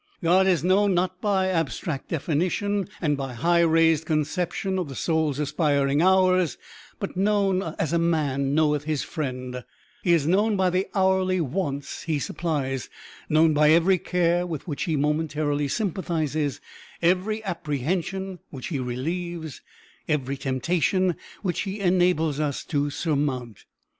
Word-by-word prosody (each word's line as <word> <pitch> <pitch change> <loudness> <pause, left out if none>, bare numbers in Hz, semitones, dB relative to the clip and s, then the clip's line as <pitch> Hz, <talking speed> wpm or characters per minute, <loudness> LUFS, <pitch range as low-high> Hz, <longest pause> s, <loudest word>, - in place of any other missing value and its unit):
God 185 +3 +4
is 175 -4 +2
known, 190 +1 +3
not 185 +1 -1
by 195 -3 +1
abstract 165 -3 -2
definition, 180 +6 -1
and 150 -2 +2
by 135 -2 -5
high 170 +8 +2
raised 165 -1 +3
conceptions 180 +5 -1
of 175 -5 -3
the 135 - -7
soul's 160 -3 0
aspiring 145 -1 +1
hours, 185 -2 +3 0.4
but 200 - -4
known 195 -1 +2 0.2
as 160 0 -1
a 170 - +3
man 145 -5 0
knoweth 150 -2 +2
his 155 -3 -1
friend; 125 -5 -5 0.4
he 175 - +1
is 160 -4 +2
known 205 +6 +2
by 185 -1 +2
the 185 +2 0
hourly 190 -1 +2
wants 145 -2 -3
he 160 -2 -1
supplies; 140 -4 -2 0.4
known 155 +1 +4
by 150 0 +4
every 170 +4 +4
care 175 -1 +1
with 160 -2 -6
which 145 -4 -3
he 160 - 0
momentarily 150 0 0
sympathizes, 155 - -1 0.4
every 190 +5 +1
apprehension 180 - -3
which 130 -3 -7
he 150 -6 -2
relieves, 160 +5 -4 0.5
every 140 -3 -1
temptation 155 +7 0 0.3
which 180 -4 -1
he 200 +1 -3
enables 175 -5 +2
us 145 -3 -1
to 145 -2 0
surmount. 140 - -2
165 Hz, 140 wpm, -25 LUFS, 145-185 Hz, 0.5 s, God